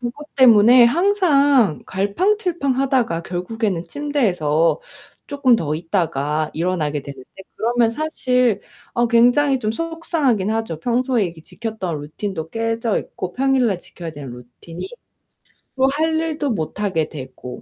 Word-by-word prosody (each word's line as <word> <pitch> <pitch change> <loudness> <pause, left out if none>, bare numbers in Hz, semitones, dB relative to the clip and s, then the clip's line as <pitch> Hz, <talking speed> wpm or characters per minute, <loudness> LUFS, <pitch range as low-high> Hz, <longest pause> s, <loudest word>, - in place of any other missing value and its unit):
그것 275 +6 -7
때문에 240 -1 +7
항상 285 - +3
갈팡질팡하다가 270 - 0
결국에는 180 +1 -3
침대에서 195 - 0 0.5
쪼끔 280 -4 +3
더 155 -6 -2
있다가 155 -3 -1
일어나게 155 -4 -1
되는데 135 -2 -11 0.3
그러면 235 0 +2
사실 250 -4 0 0.3
어 240 0 +2
굉장히 245 +4 +4
좀 215 -2 -1
속상하긴 305 - -1
하죠. 220 -8 -3
평소에 245 +1 +1
이렇게 170 -2 -6
지켰던 195 -9 -5
루틴도 160 +2 -5
깨져 225 -1 -1
있고 180 -1 -6
평일날 255 -7 +2
지켜야 170 -2 -9
되는 140 -4 -8
루틴이. 125 - -10 0.9
또 265 0 +4
할 315 +3 0
일도 310 -3 -2
못 200 0 -4
하게 175 -7 0
되고 130 -3 -9
225 Hz, 295 characters per minute, -20 LUFS, 170-270 Hz, 0.9 s, 때문에